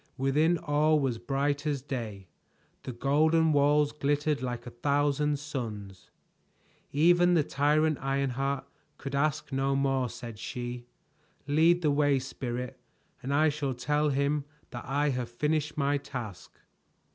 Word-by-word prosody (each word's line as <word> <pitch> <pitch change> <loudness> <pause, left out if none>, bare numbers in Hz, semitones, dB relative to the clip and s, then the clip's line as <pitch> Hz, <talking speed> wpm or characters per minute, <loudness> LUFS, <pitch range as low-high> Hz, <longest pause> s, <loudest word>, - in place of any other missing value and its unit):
Within 150 +6 +2
all 155 -1 +2
was 130 -5 -1
bright 140 +4 -1
as 140 -3 -1
day; 110 -9 -5 0.5
the - - -6
golden 155 +6 +2
walls 145 +1 +3
glittered 145 0 0
like 120 -1 -4
a 125 - -7
thousand 145 +3 +1
suns. 110 -10 -6 0.8
"Even 175 +4 +4
the 160 - +4
tyrant 150 +2 +1
Ironheart 135 0 -1 0.3
could 140 -1 -7
ask 145 +1 0
no 135 +1 +1
more," 135 -2 +1
said 115 -3 -9
she. 120 0 -6 0.6
"Lead 165 +5 +3
the 150 - +3
way, 145 -1 +3
Spirit, 125 -2 -5 0.4
and 135 - -4
I 155 +2 +4
shall 140 -3 -2
tell 150 +4 +1
him 140 +1 0 0.3
that 120 - -7
I 145 +3 +1
have 125 -3 -2
finished 150 +5 -1
my 140 0 +1
task." 120 -9 -8
140 Hz, 135 wpm, -29 LUFS, 130-150 Hz, 0.8 s, Even